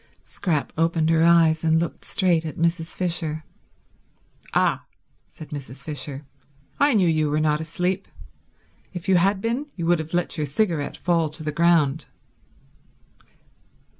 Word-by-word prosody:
Scrap 160 -7 -2
opened 165 -1 +2
her 160 -1 +3
eyes 165 -1 +4
and 160 0 +3
looked 170 - -4
straight 175 -4 +2
at 155 - -6
Mrs. 165 0 0
Fisher. 165 -3 -2 1.1
"Ah," - - +2 0.5
said 155 - -12
Mrs. 140 -2 -8
Fisher, 145 -1 -6 0.5
"I 285 -3 +4
knew 190 -4 +4
you 155 -2 +2
were 150 +1 +1
not 155 0 +1
asleep. 180 +4 -2 0.9
If 175 - -6
you 190 -1 +5
had 190 +2 +2
been 240 +7 -2
you 170 - -4
would 175 0 +3
have 160 +2 -4
let 175 -1 -1
your 150 - -1
cigarette 155 -1 -1
fall 170 -3 +1
to 155 +1 -8
the 150 - -2
ground." 165 -2 +2
165 Hz, 145 wpm, -23 LUFS, 155-175 Hz, 1.1 s, you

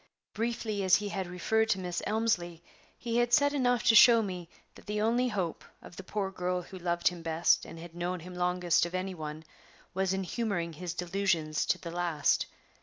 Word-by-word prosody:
Briefly 225 -2 -2
as 185 -1 +6
he 205 0 -1
had 190 -2 -3
referred 220 +5 0
to 195 - +2
Miss 180 -1 -3
Elmslie, 175 -7 -1 0.3
he 235 -1 -2
had 240 0 +2
said 285 +3 +4
enough 245 -4 +1
to - - +5
show 230 0 +8
me 180 -4 -6 0.2
that - - -17
the 210 0 -2
only 235 +4 +2
hope 190 -8 -3 0.2
of - - -13
the 195 - -7
poor 195 0 -3
girl 180 -1 -2
who 185 +2 -10
loved 175 -1 +1
him 175 -1 -9
best 165 +1 +2
and - - -10
had 165 0 -10
known 175 +1 -3
him 180 +2 -9
longest 180 -1 +1
of 175 - -7
any 185 +1 -2
one 155 -2 -7 0.5
was 190 0 0
in 190 0 -1
humoring 185 -5 -2
his 175 +1 -6
delusions 175 -4 0
to - - +2
the 170 - -8
last. 170 -4 +1
180 Hz, 200 wpm, -30 LUFS, 175-215 Hz, 0.5 s, show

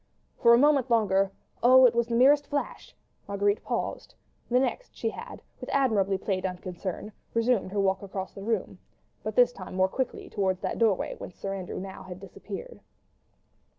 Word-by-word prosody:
For 235 -2 +6
one 235 - +6
moment 280 -3 +4
longer—oh! 220 +4 +3
it 245 - +5
was 235 0 +1
the 235 - -1
merest 285 +4 +5
flash—Marguerite 205 -7 -3
paused: - - -4 0.3
the 250 +1 +4
next 270 - -2
she - - -2
had, - - -9 0.2
with - - -8
admirably 205 -8 +2
played 190 -1 -2
unconcern, 185 +2 -5 0.2
resumed 230 -4 +1
her 205 - -1
walk 190 -1 +1
across 190 -1 -6
the 195 - -9
room—but 225 +3 -5
this - - +5
time - - -9
more 185 0 +3
quickly 260 +7 -3
towards 190 -3 -1
that - - -3
doorway 220 -5 +2
whence 180 - -9
Sir 195 0 -4
Andrew 185 -2 -6
had - - -5
now 190 -1 -8
disappeared. 195 - -9
205 Hz, 160 wpm, -27 LUFS, 190-250 Hz, 0.3 s, For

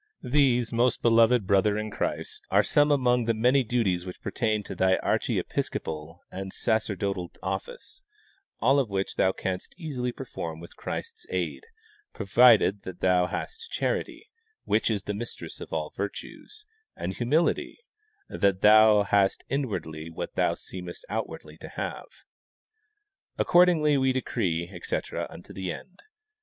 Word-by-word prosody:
These, 125 -4 +2
most 120 +1 +1
beloved 115 -1 +5
brother 100 +2 +3
in 110 0 -3
Christ, - - -4
are - - +4
some 145 0 +3
among 125 -4 +3
the 115 0 +1
many 125 +5 +3
duties 105 -7 0
which 90 -1 -8
pertain 110 -3 -1
to - - -7
thy 95 0 +3
archiepiscopal 80 -1 -2
and 95 0 -6
sacerdotal 100 -5 -1
office, 485 -5 -5 0.6
all 135 +4 +4
of 130 -6 0
which 95 -1 -2
thou 95 - +3
canst 95 -1 -4
easily 130 -7 -3
perform 85 -11 -6
with 85 - -12
Christ's 455 -1 -6
aid, 445 - -3 0.5
provided 105 -1 +5
that 95 -2 -9
thou 90 -1 +3
hast 455 - -5
charity, 445 - -2 0.4
which 110 - +1
is 105 -4 -1
the 105 - -3
mistress 115 +4 -6
of - - -8
all 75 -1 -3
virtues, 310 - -7 0.3
and 95 - -4
humility, 140 - +1 0.5
and - - -8
that 100 -2 +3
thou 105 0 +7
hast 100 -1 +2
inwardly 90 - -3
what 80 - -6
thou - - +1
seemest 90 -2 -8
out 110 +2 -1
wardly - - -11
to - - -9
have. - - -5 1.3
Accordingly 170 -5 +4
we 130 0 +2
decree, 90 -10 -1
etc, 90 - -3
unto - - -12
the 95 -2 -3
end. 185 - -10
110 Hz, 145 wpm, -27 LUFS, 95-130 Hz, 1.3 s, thou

